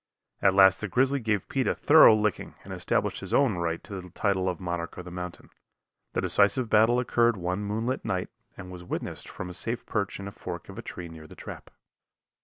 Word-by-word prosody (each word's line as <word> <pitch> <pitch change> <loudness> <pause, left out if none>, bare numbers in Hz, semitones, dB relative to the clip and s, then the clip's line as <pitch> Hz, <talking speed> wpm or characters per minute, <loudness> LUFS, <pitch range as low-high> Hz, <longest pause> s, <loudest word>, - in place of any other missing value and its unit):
At 95 -1 +4
last 95 -1 +6
the 105 - -2
grizzly 135 +8 +2
gave 110 -5 -1
Pete 135 -2 -1
a - - +1
thorough 145 -7 +7
licking 105 -2 -1
and - - -8
established - - -1
his - - -2
own 130 -9 +3
right 85 -1 -2
to 100 -3 -7
the 90 - -12
title 95 0 0
of 90 - -4
monarch 85 -2 -4
of 90 - -7
the 90 - -8
mountain. 90 -1 -7 0.6
The - - 0
decisive 105 +4 +2
battle 110 +3 +5
occurred 120 -2 +2
one 90 +2 -2
moonlight 110 +5 -2
night 90 -1 -2 0.3
and 90 -1 -9
was 90 -1 -9
witnessed 90 - -5
from 95 - -7
a 90 - -7
safe 115 +6 -3
perch 100 -3 -2
in 100 - -6
a - - -6
fork - - -7
of - - -8
a - - -4
tree 90 - -7
near 80 -1 -11
the - - -13
trap. - - -9
100 Hz, 215 wpm, -27 LUFS, 90-110 Hz, 0.6 s, thorough